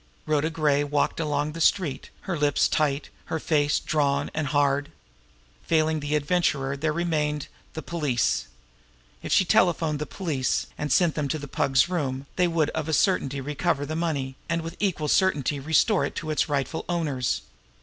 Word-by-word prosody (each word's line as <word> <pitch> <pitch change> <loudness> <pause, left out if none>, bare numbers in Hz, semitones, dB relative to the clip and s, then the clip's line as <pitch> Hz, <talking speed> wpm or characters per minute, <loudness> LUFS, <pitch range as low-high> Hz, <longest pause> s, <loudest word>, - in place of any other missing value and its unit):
Rhoda 155 0 +1
Gray 150 -3 +2
walked 145 +2 0
on 155 - -1
along 145 +1 0
the 165 +2 -6
street, 155 -6 +1
her 190 - -3
lips 145 -2 +2
tight, 145 -2 0
her 160 - -3
face 145 -2 +2
drawn 145 -1 0
and 155 -1 -1
hard. 145 0 +1 0.8
Failing 160 -1 +2
the 145 +1 -1
Adventurer, 145 -3 +1
there 155 +2 -1
remained 150 -3 -1 0.3
the 160 - -6
police. 130 - 0 0.7
If - - -6
she 190 - +5
telephoned 165 -4 +2
the 150 - -3
police 150 -9 -1
and 150 -1 -3
sent 170 0 +4
them 150 -2 -1
to 155 - -1
the 145 -1 -7
Pug's 135 +1 +2
room, 140 -7 -2
they 180 0 +3
would 165 -3 +1
of 160 0 -3
a - - 0
certainty 140 -6 +1
recover 150 +1 -1
the 155 +2 -4
money, 150 -6 -1 0.2
and 170 0 0
with 165 0 -6
equal 180 -7 0
certainty 145 -5 +2
restore 160 - +3
it - - -3
to 155 -1 -3
its 155 - 0
rightful 145 +2 -1
owners. 150 -8 -1
150 Hz, 175 wpm, -26 LUFS, 145-165 Hz, 0.8 s, she